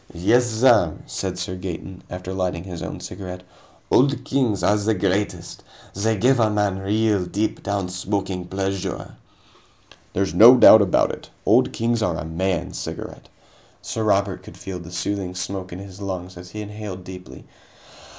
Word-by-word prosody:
"Yes, 120 +9 +3
sir," 110 -7 +4
said 95 -2 -4
Sir 90 0 -4
Gaeton, 90 0 -6
after 90 +1 -6
lighting 90 -2 -2
his 90 -3 -7
own - - -6
cigarette, 90 -2 -7 0.5
"Old 130 -1 +3
Kings 125 -7 0
are 105 - +4
the 105 +1 +1
greatest. 95 -2 -2 0.3
They 110 +3 0
give 125 +5 +3
a 110 -2 +4
man 105 -2 0
real, 105 0 +1
deep 105 +4 -2
down 100 -2 -2
smoking 95 0 -3
pleasure." 95 0 -3 1.0
"There's 95 0 0
no 120 +4 +9
doubt 110 -2 +9
about 95 -3 +3
it, - - -10 0.2
Old - - +4
Kings 115 0 0
are 90 -6 0
a 75 - -5
man's 90 +2 -2
cigarette." - - -7 0.5
Sir 110 - -3
Robert 100 -3 +1
could 110 +3 -13
feel 95 -2 -6
the 85 0 -10
soothing 90 +1 -3
smoke 95 0 -4
in 90 - -6
his 95 0 -10
lungs 95 -2 -5
as 90 0 -10
he 105 +3 -6
inhaled 105 -3 -7
deeply. 90 0 -10
95 Hz, 160 wpm, -22 LUFS, 90-105 Hz, 1.0 s, no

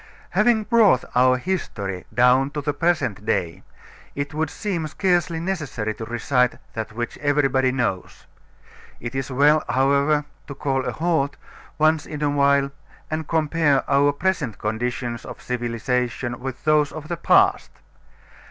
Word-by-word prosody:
Having 230 -3 +3
brought 210 - +4
our 130 +1 +4
history 105 - -4
down 125 +2 +4
to 150 - -1
the 145 0 -1
present 145 - 0
day, 85 -5 -1 0.5
it 140 +1 -4
would 155 0 -1
seem 180 -6 -3
scarcely 175 -1 0
necessary 150 - -3
to 115 - -7
recite 125 +2 +1 0.2
that 110 -1 -5
which 120 +1 -5
everybody 135 -3 +2
knows. 120 -8 -3 0.7
It 120 +1 -6
is 135 0 -3
well, 145 +4 +4
however, 140 +3 +2 0.2
to 140 - -7
call 135 -2 -1
a - - -1
halt 160 -4 0 0.4
once 155 0 +2
in 150 -1 -5
a 145 - +2
while 140 -1 +3 0.4
and 155 -1 -3
compare 155 -3 +1
our 140 +1 +4
present 145 - -1
conditions 120 +2 -3
of - - -9
civilization 120 0 -2
with 130 -1 -6
those 150 -1 +3
of 155 -1 -8
the 170 +1 -3
past. - - +3
140 Hz, 145 wpm, -23 LUFS, 125-155 Hz, 0.7 s, brought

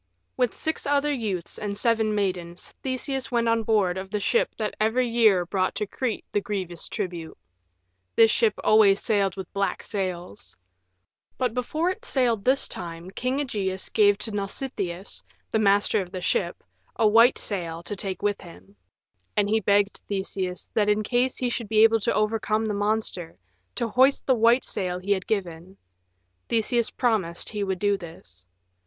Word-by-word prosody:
With 250 -2 0
six 315 -2 -3
other 290 +1 +2
youths 205 -9 -4
and 205 -1 -4
seven 220 -1 +1
maidens 180 -4 -3
Theseus 265 0 -2
went 235 -1 +1
on 230 0 +2
board 205 -5 +1
of 190 0 -7
the 210 +1 -2
ship 205 - +1
that 215 -2 -2
every 240 +4 +2
year 220 -6 +4
brought 185 +1 -1
to 210 - -1
Crete 235 +2 -3
the 205 - +1
grievous 185 -5 -3
tribute. 175 -6 -5 0.8
This 225 -1 +6
ship 220 -2 +2
always 210 -2 +5
sailed 200 -4 +1
with 190 -2 -7
black 200 0 -1
sails. 180 - -5 0.8
But 250 -3 0
before 310 +8 -1
it 445 +5 -8
sailed 245 - +1
this 265 +2 +3
time 170 +1 -7
King 255 +6 -2
Ægeus 200 -9 -3
gave 205 -2 +5
to 220 - -4
Nausitheus, 200 -3 -4 0.3
the 220 - +2
master 205 -1 +3
of 180 -1 -8
the 185 - -5
ship, 475 - -1 0.3
a 220 - +3
white 230 +4 +6
sail 170 -4 -4
to 205 - -5
take 190 -1 -4
with 205 -1 0
him. 95 +4 -14 0.6
And 205 -1 +3
he 220 +2 +2
begged 200 0 +2
Theseus, 190 -2 -3
that 210 -1 +2
in 210 +1 +2
case 245 +3 0
he 250 - 0
should 235 -3 -4
be 215 0 +5
able 225 0 +5
to 200 - 0
overcome 215 +1 0
the 215 - -1
monster, 205 -4 -2 0.4
to 235 - 0
hoist 260 +5 +3
the 265 - +4
white 235 +2 +4
sail 180 -2 -3
he 185 +3 -4
had 190 -2 0
given. 185 -2 -3 0.7
Theseus 235 +1 +1
promised 205 -9 -1
he 210 -2 -3
would 190 -1 -1
do 205 +1 +1
this. 95 - -12
210 Hz, 170 wpm, -25 LUFS, 190-230 Hz, 0.8 s, This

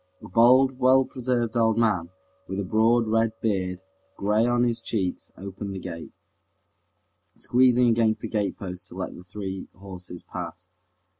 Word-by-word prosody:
A - - -11
bald, 130 +5 +5
well 130 +1 +5
preserved 125 -3 -2
old 115 -1 +3
man, 100 -8 +1 0.4
with 95 +1 -4
a - - -1
broad, 115 +4 +3
red 115 0 +1
beard, 95 -4 -1 0.3
gray 105 +3 +2
on 120 0 +2
his 120 -1 0
cheeks, 95 -6 -3
opened 100 +1 -6
the - - -4
gate, 85 -2 -7 1.2
squeezing 125 -1 +3
against 115 -1 +2
the - - -4
gatepost 100 -3 -3
to - - -12
let - - -4
the 90 - -11
three 95 0 -6
horses 90 -1 -9
pass. 90 +1 -8
110 Hz, 150 wpm, -25 LUFS, 95-120 Hz, 1.2 s, bald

